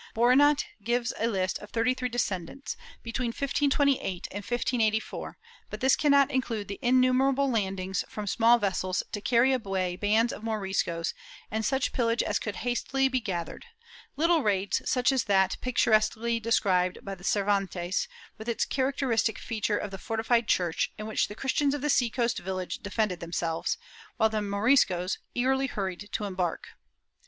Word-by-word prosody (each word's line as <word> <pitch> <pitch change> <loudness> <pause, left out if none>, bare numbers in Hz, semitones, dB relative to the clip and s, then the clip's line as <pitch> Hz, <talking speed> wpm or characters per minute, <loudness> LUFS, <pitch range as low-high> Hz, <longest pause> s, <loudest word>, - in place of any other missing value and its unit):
Boronat 275 +5 +4 0.2
gives 240 +2 0
a 225 - +1
list 190 -4 -1
of 210 - -11
thirty 230 +2 +1
three 250 -1 -3
descents, 230 +1 -3 0.3
between 240 +2 -2
1528 275 - 0
and - - -5
1584, 225 -2 -1 0.3
but - - -6
this 265 0 +4
cannot 280 -2 +4
include 235 -6 -2
the 200 - -6
innumerable 255 +2 +3
landings 190 -4 -1
from 210 - -5
small 230 +4 +4
vessels 185 -3 -1
to 205 - -4
carry 250 +4 +3
away 190 -7 -1
bands 215 +5 +2
of - - -8
Moriscos 190 -6 -1 0.4
and 220 +1 -1
such 265 +4 0
pillage 230 -1 +1
as - - 0
could 210 -3 -4
hastily 265 +2 +1
be 260 -1 +1
gath 175 -7 -3
ered— - - -10 0.5
little 330 +2 +3
raids 200 -4 +1
such 250 +1 +3
as 265 -3 +1
that 190 -2 +2
picturesquely 230 -1 +2
described 185 -5 +1
by 195 -1 -5
Cer 195 +2 0
vantes, 190 -3 0 0.3
with 220 +2 -5
its 225 -2 0
characteristic 260 -5 0
feature 215 -2 -1
of 205 - -4
the 195 - -7
fortified 225 +1 0
church, 175 -5 +1
in 215 - -6
which 220 - 0
the 205 - -9
Christians 275 +3 +1
of 290 - -5
the 295 0 +1
sea 245 -3 +3
coast 235 0 0
village 185 0 -4
defended 200 -3 -1
themselves, 165 -1 -2 0.4
while 220 -1 +4
the 215 -1 -1
Moriscos 200 -3 +2 0.2
eagerly 265 +2 +1
hurried 195 -3 -4
to - - -1
embark. 185 -4 -3
220 Hz, 160 wpm, -28 LUFS, 195-255 Hz, 0.5 s, Boronat